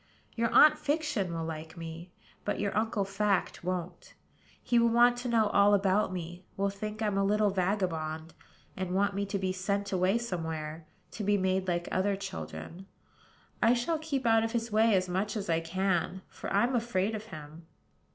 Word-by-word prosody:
Your 230 0 +1
Aunt 305 +5 +7
Fiction 295 - -1
will 165 -1 -3
like 160 +1 -7
me; 165 +1 -8 0.3
but 205 - -2
your 200 -1 -1
Uncle 215 -2 0
Fact 195 -2 0
won't. 180 -1 -4 0.5
He 240 - +3
will 235 0 +4
want 240 +1 +5
to 245 0 -4
know 225 -2 +3
all 205 0 +5
about 195 0 +2
me; 175 0 -6
will 200 0 +1
think 215 +2 -5
I'm 205 -2 +1
a - - +2
little 210 +1 +2
vagabond; 170 -5 -1 0.4
and 185 -1 -3
want 200 +1 +2
me 200 +1 -2
to 200 - -2
be 190 -1 -1
sent 200 +2 -2
away 190 +3 +2
somewhere, 160 -7 -4 0.2
to 215 - -5
be 205 +1 +3
made 190 0 0
like 175 -1 -1
other 195 +2 +1
children. 195 -1 -7 0.7
I 235 +1 +5
shall 310 +7 -1
keep 285 -5 -3
out 225 -1 +4
of 225 +1 -2
his 235 -1 -2
way 220 0 +4
as 185 -1 +1
much 190 +5 -1
as 195 -5 -2
I 165 - +3
can; 185 +2 -1
for - - -7
I'm 240 +6 +2
afraid 225 -3 0
of 215 0 -5
him." 155 -3 -11
195 Hz, 185 wpm, -30 LUFS, 180-220 Hz, 0.7 s, Aunt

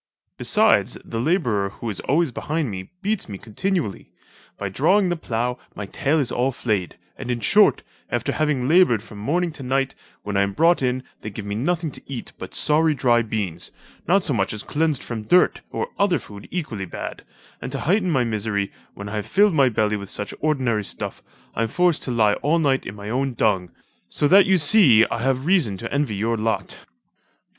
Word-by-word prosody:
Besides, - - +3
the 115 - -4
labourer, 120 - +1
who 115 - -8
is 95 - -5
always 155 +1 +1
behind 150 +1 -2
me, 95 -1 -7
beats 205 - -1
me 100 - -6
continually. 115 - -3 0.5
By 100 - -3
drawing 180 - +2
the 175 - 0
plough, 125 -5 -2 0.2
my 100 - -5
tail 140 +9 0
is 135 - 0
all 130 +2 +1
flayed; 105 - -2 0.2
and - - -6
in 120 -1 -1
short, 105 - +4 0.3
after - - -1
having 150 -5 0
laboured 150 - +4
from 105 -2 -11
morning 170 +10 0
to 155 - -11
night, 135 +1 0 0.3
when 105 -1 -4
I - - +4
am 100 0 0
brought 165 - +3
in 130 0 0 0.2
they 105 - -5
give 105 0 -7
me 100 - -4
nothing 160 +8 -1
to - - -10
eat 135 -4 -6
but - - -7
sorry 155 0 +3
dry 120 -3 +3
beans, 105 -7 -4 0.4
not 190 +2 +3
so 145 - 0
much 100 -3 0
as 105 - -5
cleansed 155 -3 0
from 115 -2 -5
dirt, 180 +12 +3
or 465 - -3
other 200 -4 +3
food 105 -5 -11
equally 130 - -4
bad; 85 - -7 0.4
and - - -5
to - - -4
heighten 185 +3 +1
my 135 -6 +2
misery, 105 -3 -2 0.2
when 100 - -7
I 105 - -4
have 105 - -4
filled 205 0 +4
my 135 -4 +4
belly 105 -2 0
with 100 -1 -8
such 105 - -4
ordinary 130 -8 0
stuff, - - -6 0.3
I - - -2
am 115 - +1
forced 175 +6 +1
to 130 - -3
lie 110 -3 +3
all 155 +4 +2
night 140 -5 +1
in 95 - -7
my 105 +1 -7
own 130 0 -1
dung: 95 -6 +1 0.4
so 145 - +1
that 195 +1 +7
you 190 0 +4
see 145 - +6
I 115 - -1
have 130 +1 0
reason 160 - +2
to - - -6
envy 140 -7 0
your 115 +3 0
lot." 110 +1 -3
125 Hz, 205 wpm, -22 LUFS, 105-160 Hz, 0.5 s, that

